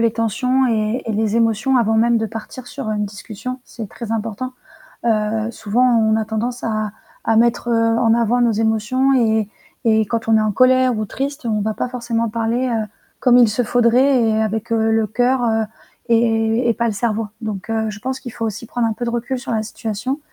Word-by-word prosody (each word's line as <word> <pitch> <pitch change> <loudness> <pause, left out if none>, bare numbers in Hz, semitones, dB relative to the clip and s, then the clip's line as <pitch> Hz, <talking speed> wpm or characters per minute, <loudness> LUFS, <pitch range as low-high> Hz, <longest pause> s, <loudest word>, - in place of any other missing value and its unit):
les 230 -1 +2
tensions 250 +4 +1
et 220 +1 0
et 225 - -1
les 215 +1 0
émotions 230 +3 +2
avant 225 -2 +2
même 230 +1 +3
de 220 - -1
partir 225 +3 -8
sur 220 - -5
une 210 -1 -1
discussion, 215 +5 -7
c'est 225 -4 -8
très 230 +1 -8
important. 225 +3 -3 0.5
Heu, 220 0 +1
souvent 225 +2 0 0.2
on 220 0 +3
a 220 0 0
tendance 230 +3 -3
à 215 -2 -1 0.3
à 225 - +2
mettre, 235 +1 +2
heu, 230 -1 +2
en 225 -1 +4
avant 235 +1 +2
nos 240 -1 +3
émotions 225 +5 +1
et 220 -2 +1 0.3
et 220 -2 +4
quand 225 +2 -3
on 225 0 +5
est - - +3
en 215 0 +1
colère 255 +1 +4
ou 215 - -1
triste, 275 +5 -4
on 215 -2 0
va 215 +1 -1
pas 250 - -3
forcément 235 -2 -2
parler, 230 +3 -1
heu, 225 -3 -1 0.3
comme 245 -1 +5
il 240 -3 +6
se 215 +4 0
faudrait 245 +3 +3
et 220 0 +1
avec, 220 +1 -2
heu, 225 -1 +2
le 220 -1 +2
cœur, 245 +3 +1
heu 225 -1 +2 0.5
et 225 0 +2
et - - +3
pas 235 - -1
le 220 - -1
cerveau, 220 +1 -1
donc 215 -2 -5
heu, 220 -1 0
je 210 0 -7
pense 260 +3 -3
qu'il 255 -2 -8
faut 225 - -3
aussi 220 +1 -4
prendre 235 0 -1
un 225 - -1
peu 240 - -6
de - - -1
recul 245 +2 -2
sur 245 - -6
la 220 -1 0
situation, 225 +5 -4
225 Hz, 220 wpm, -19 LUFS, 220-245 Hz, 0.5 s, il